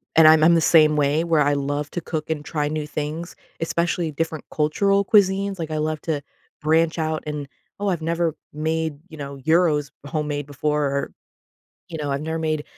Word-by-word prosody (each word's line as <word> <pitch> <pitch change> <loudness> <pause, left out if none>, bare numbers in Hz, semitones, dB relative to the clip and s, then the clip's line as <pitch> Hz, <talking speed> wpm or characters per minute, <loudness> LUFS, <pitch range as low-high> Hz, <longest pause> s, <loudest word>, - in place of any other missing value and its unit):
and 160 -1 +8
I'm 155 0 +7
I'm 170 +2 +6
the 165 - +3
same 155 -2 +5
way 150 +2 +2
where 165 -3 +2
I 145 0 +3
love 145 +1 -2
to 175 - -3
cook 155 -2 -4
and 155 -2 -2
try 150 -1 -2
new 150 0 -3
things, 155 +3 -4 0.2
especially 170 0 -1
different 160 +1 -3
cultural 195 +6 +2
cuisines. 195 -1 +3
Like, 160 -1 -4
I 155 - -1
love 155 0 -1
to 155 -3 -2 0.4
branch 160 +2 +2
out 155 0 -1
and 150 -2 -4 0.3
"Oh, 205 - -1
I've 175 -4 -1
never 165 0 0 0.2
made, 160 0 -2
you 160 - -11
know, 140 -1 -7
gyros 155 -1 +2
homemade 145 -2 -3
before 150 +1 -1
or, 140 0 -1 0.8
you 165 - -6
know, 145 -2 -3
I've 140 0 -1
never 160 +1 -3
made 155 -2 -1
155 Hz, 195 wpm, -23 LUFS, 150-165 Hz, 0.8 s, and